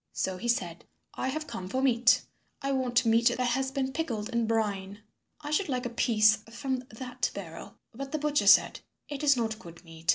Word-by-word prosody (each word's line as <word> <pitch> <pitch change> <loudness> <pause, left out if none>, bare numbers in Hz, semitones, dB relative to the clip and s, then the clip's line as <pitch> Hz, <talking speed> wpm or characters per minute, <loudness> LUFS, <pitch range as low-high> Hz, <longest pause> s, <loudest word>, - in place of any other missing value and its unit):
So 190 -1 -2
he 240 - -5
said, 175 -8 -1 0.3
"I - - -3
have 310 +4 -3
come 185 -9 -7
for 260 - -1
meat. 245 -3 +4 0.4
I 275 - 0
want 250 -3 +1
meat 230 +1 +4
that 240 - +2
has 265 +2 0
been 265 0 -2
pickled 235 -9 -3
in 235 -2 0
brine. 205 -2 -2 0.4
I 295 0 -6
should 310 +3 +1
like 250 -1 -2
a 245 - -3
piece 220 -2 +4
from 260 +3 -2
that 250 +3 -3
barrel." - - -8 0.2
But 270 +3 -7
the 310 - -1
butcher 300 0 0
said, - - +6 0.3
"It 285 -2 -5
is 280 -3 +5
not 220 -2 -2
good 170 -5 -13
meat. 165 -1 -11
240 Hz, 200 wpm, -29 LUFS, 215-270 Hz, 0.4 s, said